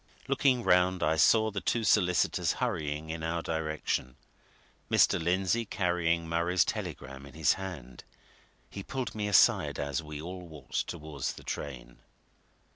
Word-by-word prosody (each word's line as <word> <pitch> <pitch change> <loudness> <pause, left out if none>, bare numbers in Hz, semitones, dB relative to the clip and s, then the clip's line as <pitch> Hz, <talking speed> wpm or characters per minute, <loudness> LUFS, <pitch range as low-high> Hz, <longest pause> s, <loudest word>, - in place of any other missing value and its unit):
Looking 130 -2 +2
round 90 -1 +3
I 80 +1 +2
saw 110 +7 +4
the 100 -1 -4
two 115 -1 0
solicitors 90 -5 +2
hurrying 75 +1 -2
in 80 0 -5
our 80 +1 -2
direction, 80 -5 -2 0.7
Mr. - - +4
Lindsey 95 +6 +1
carrying 85 -5 0
Murray's 85 +2 +2
telegram 65 0 -5
in 70 - -14
his 80 -2 +3
hand. 75 -11 -8 0.6
He 100 - -7
pulled 130 +2 -4
me 105 -1 -2
aside 100 - +4
as 70 +3 -2
we 75 -1 -8
all 90 +2 -7
walked 75 -5 -4
towards 75 -5 -4
the - - -12
train. 65 -4 -6
85 Hz, 140 wpm, -30 LUFS, 75-95 Hz, 0.7 s, saw